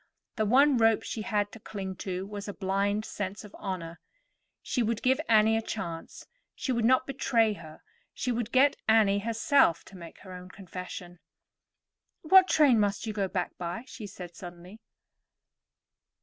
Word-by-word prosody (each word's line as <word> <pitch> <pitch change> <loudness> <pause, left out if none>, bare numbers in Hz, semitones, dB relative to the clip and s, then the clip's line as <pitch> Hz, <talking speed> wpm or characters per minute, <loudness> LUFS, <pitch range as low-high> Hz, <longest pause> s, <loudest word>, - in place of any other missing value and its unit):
The 215 -2 0
one 270 +4 +5
rope 225 -1 +3
she 220 - -5
had 205 -1 -1
to 225 - -11
cling 195 -3 -6
to 185 0 -4
was 205 0 -7
a 205 - -6
blind 200 +2 -1
sense 205 +1 -5
of 210 - -13
honor. 175 -4 -5 0.6
She 250 - -1
would 230 -1 -1
give 260 +3 +3
Annie 220 0 +5
a 225 - +1
chance, 170 -7 -6 0.3
she 265 - -3
would 235 -2 +1
not 255 +2 +4
betray 235 -5 +1
her, 160 -5 -12 0.3
she 250 - -3
would 235 -1 -2
get 270 +2 +4
Annie 210 -3 +4
herself 230 - +2
to 195 - -14
make 170 -2 -11
her 185 -1 -11
own 180 0 -10
confession. 180 -2 -9 1.0
"What 375 +3 +7
train 280 -10 +4
must 205 +1 0
you 220 - -3
go 200 -2 -1
back 185 -1 -3
by?" 175 +6 -4
she 220 -4 -9
said 180 -3 -10
suddenly. 175 +4 -11
210 Hz, 165 wpm, -28 LUFS, 185-230 Hz, 1.0 s, What